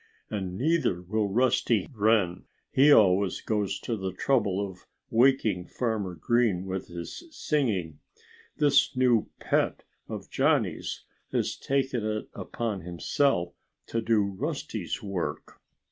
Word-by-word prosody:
And 95 -4 -3
neither 140 - +1
will 105 +3 0
Rusty 120 -1 +2
Wren. 105 -5 +2 0.3
He 140 +3 +6
always 95 -5 +5
goes 105 -3 -1
to 115 - -2
the 95 -3 -3
trouble 100 -1 +1
of 95 -3 -6 0.2
waking 115 -7 +3
Farmer 110 -7 -2
Green 105 0 +1
with 95 0 -4
his 85 - -7
singing. 105 - -1 0.6
This 145 -2 +3
new 125 -3 +3
pet - - 0 0.3
of - - -7
Johnnie's - - 0 0.3
has - - 0
taken 135 -4 -1
it 110 0 -3
upon 110 -5 -4
himself 90 - 0 0.3
to 115 - -2
do 110 -2 +3
Rusty's 100 -1 -4
work." 100 -4 -4
105 Hz, 120 wpm, -28 LUFS, 95-125 Hz, 0.6 s, He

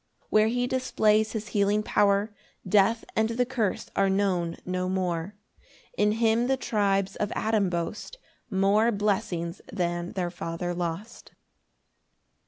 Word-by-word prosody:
7 - - -36
[Where 215 0 +5
he 245 +2 0
displays 220 -4 +1
his 215 -2 -4
healing 205 +1 +2
power, 205 +1 +2 0.3
Death 210 +4 +3
and 220 0 +2
the 245 +2 +1
curse 235 -6 -1
are 195 0 +3
known 185 -4 0
no 185 0 -2
more; 185 0 -2 0.6
In 210 - +2
him 230 +1 +2
the 265 0 +2
tribes 200 -5 0
of 210 - -2
Adam 215 -3 +1
boast 175 - -4 0.3
More 205 +3 +3
blessings 195 -5 -1
than 175 -1 -2
their 180 -2 -2
father 175 0 -4
lost. 175 +6 -5
200 Hz, 135 wpm, -27 LUFS, 180-220 Hz, 0.6 s, Where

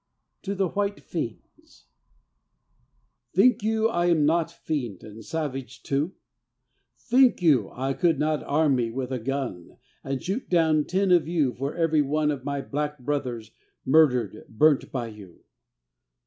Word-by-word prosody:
TO 200 0 -4
THE 190 -2 0
WHITE 200 +1 -2
FIENDS 150 -10 -7 1.5
Think 230 +7 +5
you 220 +1 +1
I 175 -5 0
am 160 -4 +3
not 165 +1 +2
fiend 125 - -4
and 110 +1 -11
savage 135 -2 -5
too? 145 +7 -1 0.8
Think 255 +1 +3
you 135 - +4
I 135 +2 -3
could 165 +1 +2
not 155 +1 0
arm 145 -2 +2
me 120 -2 0
with 130 +2 -4
a 130 - -2
gun 125 -8 -4 0.3
And 135 0 -3
shoot 200 - -4
down 160 -4 +3
ten 190 +1 +1
of 175 -3 +4
you 155 -7 +1
for 135 +5 -4
every 165 -3 +2
one 150 +1 +1
Of 135 -3 -5
my 140 0 -2
black 150 +2 -3
brothers 125 -5 -3 0.3
murdered, 125 -8 +3
burnt 145 +5 +3
by 125 -3 -2
you? 105 -6 -12
150 Hz, 150 wpm, -25 LUFS, 130-170 Hz, 1.5 s, Think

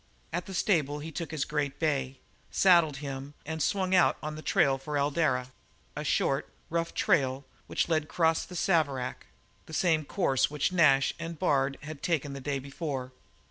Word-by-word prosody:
At 175 +1 -2
the 190 - -6
stable 155 -7 +1
he 155 +2 -7
took 165 +1 -5
his 155 -3 -2
great 145 -2 -2
bay, 135 -4 -1 0.3
saddled 170 -6 +4
him, 135 +1 -6
and 160 +1 -4
swung 190 +1 +1
out 180 -2 +5
on 155 0 -3
the 155 - -7
trail 135 -3 +2
for 145 +2 -3
Eldara, 140 -3 +1 0.4
a - - -3
short, - - +1 0.2
rough 165 0 -1
trail 135 -1 +1 0.2
which - - 0
led 160 -2 +2
across 160 0 +1
the 180 - -10
Saverack 145 -8 0 0.4
the 160 - -11
same 160 -1 +2
course 140 -5 +1
which 150 +3 0
Nash 140 -7 +4
and 165 0 -5
Bard 135 -2 +1
had 150 -1 -8
taken 145 -5 -1
the 140 - -7
day 140 +1 -1
before. 135 -1 -5
150 Hz, 175 wpm, -29 LUFS, 135-165 Hz, 0.4 s, out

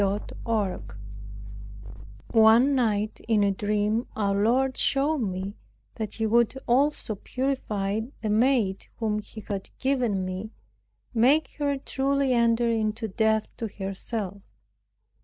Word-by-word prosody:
CHAPTER 200 +1 -2
14 215 -5 0 1.5
One 230 +5 +6
night 215 -4 0
in 215 -3 +3
a 200 - +3
dream 210 +3 0
our 200 -2 +1
Lord 250 +6 +2
showed 285 +3 +1
me, 195 -1 -3 0.4
that 215 -2 -5
He 225 - -1
would 235 +2 +3
also 270 -1 +2
purify 215 -4 -2 0.2
the 215 - 0
maid 220 -3 +2
whom 215 -2 0
He 215 +1 -9
had 200 -2 -5
given 245 -8 0
me, 185 +3 -5 0.6
make 265 +7 +4
her 285 -1 +1
truly 270 0 0
enter 235 0 +3
into 220 0 0
death 220 +1 0
to 230 - -3
herself. 195 0 -5
220 Hz, 120 wpm, -26 LUFS, 205-250 Hz, 1.5 s, One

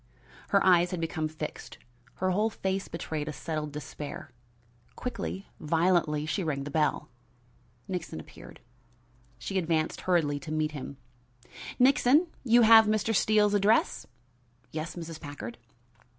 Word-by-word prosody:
Her 200 - +3
eyes 180 -1 +5
had 180 -2 -3
become 160 -1 -2
fixed; 155 0 -7 0.4
her 185 0 0
whole 210 +4 +2
face 195 -2 -3
betrayed 155 -2 -4
a - - -2
settled 150 +1 -4
despair. 145 -1 -7 0.6
Quickly, 205 -5 -5
violently, 160 -2 +1
she 185 +5 -1
rang 140 -4 -2
the 145 - -6
bell. 150 0 0 0.8
Nixon 180 - -4
appeared. 80 - -13 0.8
She 190 +10 -2
advanced 160 -2 -1
hurriedly 160 -6 +1
to 145 +3 -8
meet 155 0 0
him. 140 -1 -7 0.8
"Nixon, 270 +4 +5 0.2
you 240 -1 +5
have 225 0 +8
Mr. 215 +1 +1
Steele's 210 -1 +3
address?" 205 +2 +2 0.6
"Yes, 155 +2 -5
Mrs. 165 -2 -7
Packard." 145 -5 -8
165 Hz, 130 wpm, -29 LUFS, 150-200 Hz, 0.8 s, have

